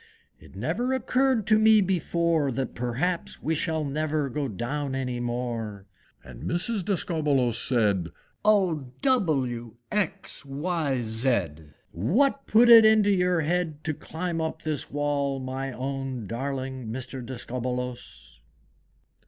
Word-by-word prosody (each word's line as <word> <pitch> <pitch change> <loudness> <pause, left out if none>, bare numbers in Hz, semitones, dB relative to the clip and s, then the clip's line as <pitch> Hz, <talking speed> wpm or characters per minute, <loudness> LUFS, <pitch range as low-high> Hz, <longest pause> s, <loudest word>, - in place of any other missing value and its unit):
It - - -16
never 180 - -1
occurred 260 -2 +1
to 215 -1 +4
me 220 0 +6
before, 170 -5 +1
That 130 0 -3
perhaps 125 +9 -2
we 160 - +1
shall 160 0 -1
never 150 0 -1
go 140 +2 -2
down 135 +6 -3
any 125 -2 -2
more!" 120 -4 -3 0.4
And 60 -1 -11
Mrs. 185 +4 -1
Discobbolos 150 - +1
said, 100 -8 +1 0.3
"Oh! 180 -11 +2
W! 135 - +1 0.2
X! 205 -1 -2
Y! 145 -1 -1
Z! 110 -4 0 0.4
What 250 - +1
put 230 +3 +6
it 230 -1 +10
into 215 -2 +5
your 180 -3 +2
head 160 -1 -1
To 155 - -1
climb 165 +2 -4
up 160 - -4
this 155 -3 -2
wall, 145 -1 -1
my 130 +1 -4
own 130 -2 -4
Darling 130 +2 -4
Mr. 130 +3 -6
Discobbolos?" 125 0 -5
140 Hz, 125 wpm, -26 LUFS, 125-180 Hz, 0.4 s, it